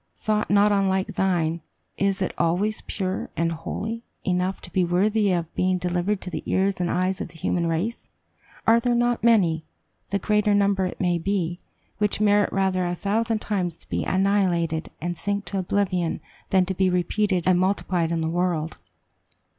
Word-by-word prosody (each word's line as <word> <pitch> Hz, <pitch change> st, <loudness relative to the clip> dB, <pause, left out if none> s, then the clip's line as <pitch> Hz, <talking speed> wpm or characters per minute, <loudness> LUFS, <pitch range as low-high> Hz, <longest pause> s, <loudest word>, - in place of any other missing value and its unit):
Thought 215 Hz, -1 st, -1 dB
not 205 Hz, +1 st, +5 dB
unlike 190 Hz, -1 st, +1 dB
thine, 170 Hz, -3 st, 0 dB, 0.3 s
is 195 Hz, 0 st, 0 dB
it -, -, -2 dB
always 195 Hz, +6 st, 0 dB
pure 185 Hz, -1 st, -3 dB
and 165 Hz, 0 st, +1 dB
holy 220 Hz, +8 st, -4 dB, 0.2 s
enough 180 Hz, +1 st, 0 dB
to -, -, -12 dB
be 185 Hz, -, +3 dB
worthy 200 Hz, +4 st, +2 dB
of 170 Hz, -2 st, -2 dB
being 185 Hz, 0 st, +1 dB
delivered 180 Hz, +3 st, -1 dB
to 180 Hz, -, -6 dB
the -, -, -3 dB
ears 190 Hz, -1 st, +1 dB
and 175 Hz, -, 0 dB
eyes 185 Hz, +2 st, 0 dB
of -, -, -3 dB
the 165 Hz, -, -14 dB
human 170 Hz, +2 st, 0 dB
race? 170 Hz, +9 st, -2 dB, 0.6 s
Are 230 Hz, +1 st, +6 dB
there 240 Hz, 0 st, +1 dB
not 240 Hz, -1 st, +1 dB
many 180 Hz, -9 st, +4 dB, 0.5 s
the 200 Hz, -, +1 dB
greater 210 Hz, +1 st, +2 dB
number 200 Hz, -2 st, +2 dB
it -, -, -8 dB
may 175 Hz, -2 st, +1 dB
be 175 Hz, -2 st, -1 dB, 0.4 s
which 210 Hz, -1 st, +1 dB
merit 205 Hz, -1 st, +3 dB
rather 190 Hz, -1 st, +1 dB
a 175 Hz, 0 st, -1 dB
thousand 220 Hz, +4 st, 0 dB
times 180 Hz, -5 st, -2 dB
to -, -, -20 dB
be -, -, -1 dB
annihilated, 185 Hz, -4 st, +1 dB
and 175 Hz, +1 st, -4 dB
sink 205 Hz, 0 st, -2 dB
to 195 Hz, -, -2 dB
oblivion, 185 Hz, -2 st, 0 dB, 0.3 s
than 190 Hz, -1 st, +4 dB
to 190 Hz, -, -2 dB
be 190 Hz, 0 st, +2 dB
repeated 180 Hz, +1 st, +1 dB
and 185 Hz, -1 st, +4 dB
multiplied 185 Hz, -3 st, 0 dB
in 165 Hz, -1 st, 0 dB
the 160 Hz, -, 0 dB
world? 170 Hz, -2 st, -1 dB
190 Hz, 180 wpm, -24 LUFS, 175-205 Hz, 0.6 s, Are